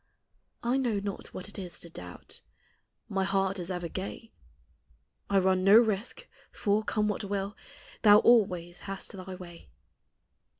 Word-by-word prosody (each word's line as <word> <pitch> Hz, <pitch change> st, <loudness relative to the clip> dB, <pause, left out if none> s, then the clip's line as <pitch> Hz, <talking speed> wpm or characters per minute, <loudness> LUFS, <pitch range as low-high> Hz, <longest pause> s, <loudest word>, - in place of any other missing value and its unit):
1 250 Hz, +3 st, +2 dB
know 230 Hz, -5 st, 0 dB
not 200 Hz, -1 st, -5 dB
what 185 Hz, -, -7 dB
it 205 Hz, -, -7 dB
is 180 Hz, -2 st, -5 dB
to -, -, -6 dB
doubt, 90 Hz, -, -10 dB, 0.7 s
My 195 Hz, -1 st, 0 dB
heart 195 Hz, 0 st, 0 dB
is 175 Hz, 0 st, -4 dB
ever 180 Hz, -2 st, -3 dB
gay; 195 Hz, +6 st, -6 dB, 1.0 s
1 195 Hz, -2 st, +3 dB
run 185 Hz, 0 st, +3 dB
no 200 Hz, +3 st, +8 dB
risk, 230 Hz, -, +1 dB, 0.2 s
for, 210 Hz, +1 st, +1 dB
come 210 Hz, -1 st, 0 dB
what 210 Hz, +1 st, -2 dB
will, 200 Hz, +1 st, -3 dB, 0.5 s
Thou 205 Hz, -1 st, +8 dB
always 180 Hz, -7 st, +3 dB
hast 195 Hz, -1 st, -6 dB
thy 185 Hz, -1 st, -8 dB
way. 175 Hz, -2 st, -12 dB
195 Hz, 145 wpm, -29 LUFS, 185-210 Hz, 1.0 s, no